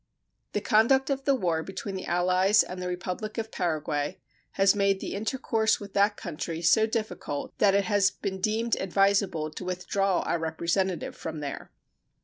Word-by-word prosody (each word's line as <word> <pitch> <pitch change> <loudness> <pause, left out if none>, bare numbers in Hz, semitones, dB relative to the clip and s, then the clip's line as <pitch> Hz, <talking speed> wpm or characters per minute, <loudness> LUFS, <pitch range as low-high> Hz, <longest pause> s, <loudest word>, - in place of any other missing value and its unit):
The 210 - 0
conduct 265 +7 +3
of 270 0 -2
the 275 - +4
war 170 -9 0
between 195 +3 -6
the 190 - -5
allies 185 +3 +3
and 180 0 -7
the 180 - -3
Republic 185 +4 -4
of 220 -1 -3
Paraguay 155 -2 -2 0.4
has 195 0 +4
made 200 -1 +2
the - - -5
intercourse 220 0 0
with 200 -1 -10
that 205 +1 +3
country 165 -1 -5
so 220 +6 +5
difficult 215 -10 -4
that 200 -2 +4
it 200 - +3
has 205 -3 +3
been 190 -2 -5
deemed 225 +3 +1
advisable 195 -4 +1
to 155 - -7
withdraw 185 +1 0
our 170 - -1
representative 170 +3 -1
from 160 -1 -6
there. 145 -1 -6
195 Hz, 165 wpm, -27 LUFS, 175-210 Hz, 0.4 s, so